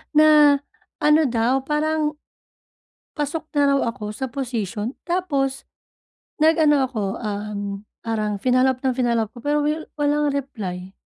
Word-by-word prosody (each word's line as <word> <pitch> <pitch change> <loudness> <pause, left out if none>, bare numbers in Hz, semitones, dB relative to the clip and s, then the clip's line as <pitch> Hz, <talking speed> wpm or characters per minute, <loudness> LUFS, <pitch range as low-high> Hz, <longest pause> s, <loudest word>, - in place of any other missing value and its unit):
na 300 -2 +6 0.4
ano 300 +1 +5
daw 240 +2 +1
parang, 305 +1 0 1.0
pasok 300 +1 -3
na 285 -1 +4
raw 275 0 +3
ako 210 -4 -6
sa 265 +5 -4
posisyon 235 -3 -4
tapos, 285 -7 -1 0.8
nag 315 +1 +5
ano 295 -1 +5
ako, 235 -5 -4 0.2
um, 205 -2 -4 0.2
parang 215 -2 -1
finollow 255 +3 +3
up 255 - -26
ng 260 - +2
finollow 235 -3 +1
up 210 - -25
ko 240 - -10
pero 295 +1 +1
wil 305 +2 -2
walang 295 0 +2
reply. 195 -10 -5
270 Hz, 140 wpm, -22 LUFS, 225-295 Hz, 1.0 s, na